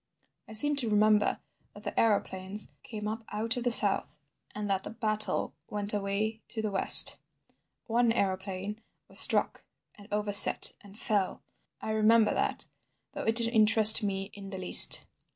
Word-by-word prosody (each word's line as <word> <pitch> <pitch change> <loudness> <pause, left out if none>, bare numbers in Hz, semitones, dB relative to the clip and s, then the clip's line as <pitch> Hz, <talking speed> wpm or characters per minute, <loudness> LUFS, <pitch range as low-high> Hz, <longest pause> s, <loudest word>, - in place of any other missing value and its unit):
"I - - -14
seem 290 +7 +1
to 245 -5 0
remember 210 0 -1 0.3
that 205 - -16
the 205 - -6
aeroplanes 200 -2 -3
came 210 -3 -10
up 220 +1 -8
out 225 +2 -4
of 245 - -7
the 245 - -2
south, - - +4 0.4
and 210 0 -7
that 195 -1 -4
the - - -11
battle 215 -2 -5 0.2
went 205 0 -2
away 210 +2 -6
to 230 - -9
the 215 - -5
west. 195 - +7 0.7
One 235 0 -2
aeroplane 195 0 -6 0.3
was - - -2
struck, - - -1 0.3
and 205 -1 -19
overset 205 -1 +2
and 200 0 -19
fell. 205 -4 -5 0.4
I 220 - -7
remember 220 +1 0
that—though - - -9
it 225 - -3
didn't 230 0 +2
interest 220 0 +5
me 195 -1 -7
in 200 -1 -13
the 190 - -10
least. 185 -1 +5
210 Hz, 155 wpm, -26 LUFS, 200-225 Hz, 0.7 s, west